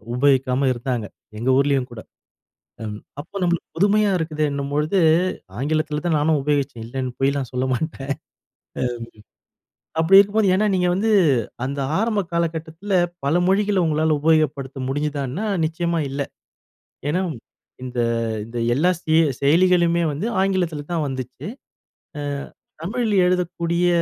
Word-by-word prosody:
உபயோகிக்காம 135 0 +2
இருந்தாங்க, 120 -2 -3 0.3
எங்க 125 +3 -1
ஊரிலேயும் 140 -2 +2
கூட, 110 - -8 0.8
ம் 105 -1 -5 0.2
அப்போ 175 +6 -19
நம்மளுக்கு 175 -1 0
புதுமையா 205 +2 +3
இருக்குதேன்னும் 150 -3 -2
பொழுது, 155 +6 +1 0.6
ஆங்கிலத்தில 155 +2 -1
தான் 160 -3 +2
நானும் 155 0 +2
உபயோகிச்சேன் 140 -6 -1
இல்லைன்னு 130 +1 -4
பொய்லாம் 135 -2 +1
சொல்ல 125 +1 0
மாட்டேன், 140 0 -3 1.9
அப்படி 190 +4 +7
இருக்கும்போது 205 0 +2
ஏன்னா 210 +2 +2
நீங்க 180 -1 +2
வந்து 220 +4 +1 0.6
அந்த 140 +1 -3 0.2
ஆரம்ப 220 -2 +1
காலகட்டத்தில 165 +3 -2 0.3
பல 145 +4 +2
மொழிகள 200 0 +2
உங்களால 155 0 +2
உபயோகப்படுத்த 145 -4 +1
முடிஞ்சிதானா? 145 +4 -2 0.2
நிச்சயமா 170 +1 -1
இல்ல, 140 - -2 0.9
ஏன்னா 170 +5 +1 0.6
இந்த 125 -1 -3 0.4
இந்த 115 +2 -6 0.2
எல்லா 170 +7 +3
செ 155 - +1 0.3
செயலிகளுமே 170 +3 +4
வந்து 155 +10 -3
ஆங்கிலத்தில 180 -6 0
தான் 160 -3 0
வந்துச்சு, 130 -2 -6 0.7
ஆ - - -3 0.6
தமிழில 215 +2 0
எழுதக்கூடிய 175 -1 0
155 Hz, 115 wpm, -22 LUFS, 140-180 Hz, 1.9 s, அப்படி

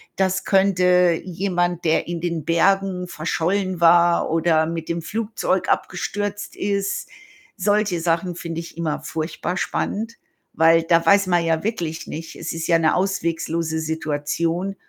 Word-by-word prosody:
Das 190 0 0
könnte 180 -3 +3
jemand, 175 -1 -1
der 160 0 +2
in 170 -1 -4
den 170 -3 -3
Bergen 180 +2 +1
verschollen 180 +3 -1
war, 170 0 +5
oder 160 -1 +2
mit 165 -1 -5
dem 170 0 -2
Flugzeug 205 -1 -2
abgestürzt 205 +3 -2
ist 200 0 -2 0.5
solche 205 -2 +1
Sachen 170 +2 0
finde 165 -1 -5
ich 170 - -11
immer 160 -3 -2
furchtbar 160 +2 -3
spannend, 225 +4 -2 0.4
weil 165 +1 +5
da 165 0 +3
weiß 200 +2 +5
man 175 -2 +2
ja 160 -1 0
wirklich 170 -7 -3
nicht 160 +1 -7
es 165 - -5
ist 165 0 -4
ja 170 -1 +4
'ne 160 -1 +2
ausweglose 165 -3 -1
Situation 160 +4 -2
175 Hz, 140 wpm, -22 LUFS, 165-190 Hz, 0.5 s, war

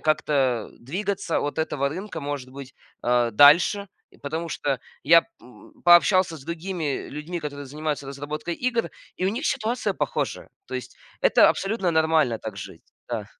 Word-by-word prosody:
как-то, 155 -1 0 0.4
э, - - -21
двигаться 195 - -2
от 145 +2 -3
этого 140 -3 0
рынка, 175 +1 -6
может 140 -3 -5
быть, 135 0 -10 0.3
э, 120 -1 +2
дальше. 165 - +6 0.2
И - - -22
потому 160 +4 -4
что 140 -4 -1 0.2
я, 165 +3 +6 0.2
м, 125 - -16
пообщался 175 0 +5
с 135 - -13
другими 170 -3 -3
людьми, 160 +4 -5
которые 145 -1 -6
занимаются 150 0 -4
разработкой 150 +4 -5
игр, 240 +1 -1 0.3
и 185 - -1
у - - +3
них 250 +8 -4
ситуация 235 +3 -1
похожая. - - -3 0.2
То - - -7
есть - - -6 0.2
это - - +6
абсолютно 195 -3 0
нормально 160 -7 +2
так 110 -3 -7
жить. - - -9 0.3
Да. - - -3
155 Hz, 160 wpm, -24 LUFS, 140-180 Hz, 0.4 s, дальше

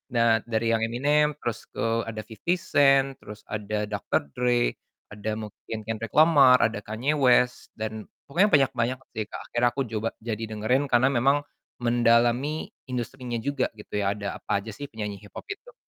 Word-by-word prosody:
Nah 115 -1 +4
dari 115 0 -1
yang 115 - +2
Eminem 150 +5 +2
terus 120 -2 -3
ke - - -4 0.3
ada 110 -1 -5
50 110 0 -13 0.3
Cent, 135 -1 +5
terus 105 0 -11
ada 105 0 -3
Dr. 105 -6 -1
Dre, 120 -1 +2 0.4
ada 105 +1 -5
mungkin 110 +1 -7
Kendrick 115 -1 -4
Lamar, 145 -5 +7
ada 110 -1 +1
Kanye 110 +7 -2
West 125 -1 +2
dan 110 -1 -5 0.2
pokoknya 180 +9 +3
banyak 135 -2 +4
banyak 120 +3 +1
sih 110 - -3
Kak. - - -7
Akhirnya 120 +1 +3
aku 140 - 0
coba 110 +1 -1
jadi 115 -1 -3
dengerin 110 +6 0
karena 130 +1 +3
memang 140 +3 +2 0.4
mendalami 120 +5 +2 0.2
industrinya 125 0 -4
juga 135 +3 -1
gitu 105 -1 -5
ya 100 0 0
ada 100 -1 -5
apa 100 - -1
aja 110 - -7
sih 145 +8 -7
penyanyi 105 -6 -6
hip-hop - - -9
itu. - - -9
120 Hz, 170 wpm, -26 LUFS, 110-135 Hz, 0.4 s, Lamar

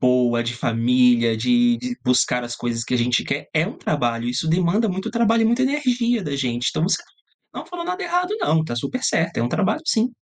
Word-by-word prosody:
boa 125 -2 +2
de 120 - -3
família, 120 0 +2
de 240 - +3
de 250 -1 -4
buscar 125 0 +2
as 120 0 -6
coisas 115 -1 -3
que 125 - -2
a - - +3
gente 120 +1 +1
quer, - - -3
é - - +3
um - - -7
trabalho, 120 0 -1
isso 135 +6 -2
demanda 180 +6 +2
muito 190 0 -3
trabalho 230 -1 +2
e - - +2
muita 235 +3 +2
energia 250 -4 +1
da 145 -4 -4
gente. 125 -3 -2
Então - - -2
você 190 - +1 0.5
não - - -6
falou 350 -1 -7
nada 365 +2 -3
errado, 360 +3 -1
não, 160 - +2
está 120 -7 -4
super 250 - -4
certo, 165 +1 0
é - - +1
um 120 - 0
trabalho 210 - 0
sim. 230 +2 +2
160 Hz, 225 wpm, -21 LUFS, -, 0.5 s, de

